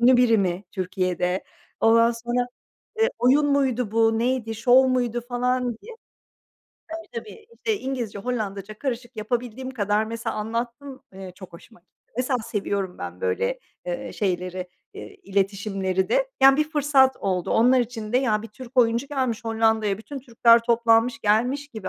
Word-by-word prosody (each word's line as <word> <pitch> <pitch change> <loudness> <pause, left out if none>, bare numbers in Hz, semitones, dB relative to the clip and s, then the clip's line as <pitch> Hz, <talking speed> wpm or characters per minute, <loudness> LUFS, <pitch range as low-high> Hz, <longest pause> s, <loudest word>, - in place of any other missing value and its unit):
ünlü 250 +1 +6
biri 240 -3 +4
mi 185 0 -1
Türkiye'de? 185 -1 -1 0.4
Ondan 230 +1 +5
sonra, 240 +1 -2 0.5
eee, 450 - +4
oyun 275 +4 +4
muydu 260 -5 +1
bu, 225 0 +3
neydi, 235 -2 -1
şov 250 +4 +5
muydu 245 -2 0
falan 250 +1 0 0.2
diye. 475 - -10 1.2
Tabii, 230 - -9 0.2
tabii 450 - +2
İngilizce 255 - -4
Hollandaca 215 -3 -4
karışık 245 -3 -4
yapabildiğim 245 +3 -3
kadar 210 -3 0
mesela 230 +1 -4
anlattım, 235 +5 -4
eee, 190 -1 -9
çok 185 -2 -12
hoşuma 175 +5 -15
gitti. 180 - -48 0.2
Mesela 250 +1 0
seviyorum 200 -4 -3
ben, - - -7
böyle, 480 +1 -1 0.3
eee, - - -4
şeyleri, 185 -2 -2 0.3
eee, 405 - -9
iletişimleri 195 - -1
de. - - +1
Yani, 270 0 +8
bir 305 +1 0
fırsat 280 -3 +3
oldu. 185 -3 -1
Onlar 250 +3 +4
için 225 -2 -5
de, 250 - +4
ya, 215 -5 +1
bir 225 - -8
Türk 255 +4 -13
oyuncu 235 +2 +3
gelmiş 260 -6 -2
Hollanda'ya, 220 -2 +1
bütün 275 +5 -8
Türkler 235 -2 +4
toplanmış 230 0 +3
gelmiş 245 +8 +1
gibi 220 -8 -7
230 Hz, 150 wpm, -24 LUFS, 210-255 Hz, 1.2 s, Yani